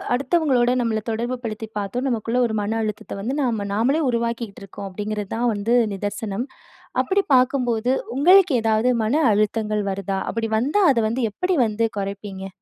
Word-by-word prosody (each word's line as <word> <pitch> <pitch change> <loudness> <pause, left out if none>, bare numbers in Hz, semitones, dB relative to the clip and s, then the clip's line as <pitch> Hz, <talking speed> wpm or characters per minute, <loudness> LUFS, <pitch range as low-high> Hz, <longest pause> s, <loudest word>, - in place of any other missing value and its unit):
அடுத்தவங்களோட 275 -4 +2
நம்மள 220 -2 0
தொடர்பு 235 +3 -2
படுத்தி 220 0 -4
பார்த்தோ, 205 +5 -3
நமக்குள்ள 235 0 -1
ஒரு 220 - -3
மன 215 +2 -1
அழுத்தத்தை 215 -2 -5
வந்து 250 +7 -2
நாம 225 -5 -1
நாமளே 265 +9 +2
உருவாக்கிக்கிட்டு 235 -3 -3
இருக்கோம் 195 +1 -8
அப்படிங்கிறது 210 +1 -4
தான் 240 +1 +1
வந்து 210 +4 0 0.2
நிதர்சனம். 205 +4 -4 0.5
அப்படி 395 +1 +1
பார்க்கும்போது 250 -2 +2 0.2
உங்களுக்கு 355 +4 +6
ஏதாவது 220 +2 +2
மன 220 +6 +1 0.2
அழுத்தங்கள் 215 0 0
வருதா? 195 0 -3
அப்படி 225 0 -2
வந்தா 285 - +1
அதை 235 -3 +2
வந்து 240 +4 -2
எப்படி 365 - -1
வந்து 220 +1 0
குறைப்பீங்க? 195 -1 -5
225 Hz, 150 wpm, -22 LUFS, 210-250 Hz, 0.5 s, உங்களுக்கு